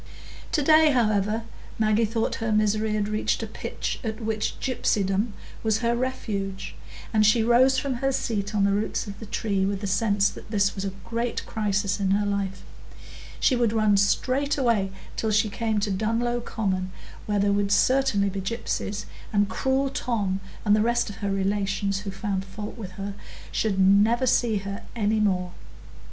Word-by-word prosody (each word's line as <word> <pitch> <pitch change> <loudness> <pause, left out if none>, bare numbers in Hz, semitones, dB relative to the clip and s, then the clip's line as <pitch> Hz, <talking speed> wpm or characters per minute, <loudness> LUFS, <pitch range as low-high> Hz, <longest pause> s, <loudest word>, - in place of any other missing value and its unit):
To 300 - +2
day 310 +1 +6
however, 215 -2 +1 0.3
Maggie 220 +1 +3
thought 225 +1 -1
her 225 -1 0
misery 215 0 +2
had 205 -1 0
reached 215 0 0
a - - -1
pitch - - -4
at 220 -1 -3
which 220 -1 -2
gypsydom 205 -4 0 0.3
was 220 -1 +1
her 235 0 +2
refuge, 210 -6 -3 0.4
and 215 -1 +4
she 215 +2 +4
rose 255 +3 +5
from 270 +1 -1
her 270 0 +2
seat 215 -5 -2
on 200 - +3
the 200 - +3
roots 205 +3 -1
of 200 -1 -8
the 220 - -8
tree 200 -2 -1
with 195 0 0
the 205 - -5
sense 200 +1 +2
that - - -12
this 200 -2 +2
was 195 - -5
a 195 - -1 0.2
great 235 +1 -2
crisis 205 -2 -1
in 195 -1 0
her 205 - 0
life; 200 -1 -2 0.8
she 260 - +3
would 235 -3 +1
run 215 -2 +3
straight 255 +8 +1
away 230 -7 +1 0.2
till 220 - -1
she 215 +1 +2
came 220 -1 0
to 205 - 0
Dunlow 230 +4 0
Common, 190 -5 -2 0.4
where 210 -1 +1
there 200 0 +2
would 200 0 +1
certainly 255 -3 +3
be 195 0 -4
gypsies; 210 -1 -3 0.3
and 205 -1 +2
cruel 265 +6 0
Tom, 205 -8 -1 0.3
and 205 0 +5
the 215 - +2
rest 235 -1 +1
of 200 - -11
her 200 - -2
relations 195 0 0
who 205 0 -6
found 195 -1 -2
fault 205 +2 -7
with 195 -5 -8
her, 200 +1 -5 0.4
should 200 -3 0
never 205 +6 +4
see 235 -3 +2
her 200 +2 -5
any 215 -1 +1
more. 185 -4 +1
210 Hz, 180 wpm, -25 LUFS, 200-230 Hz, 0.8 s, day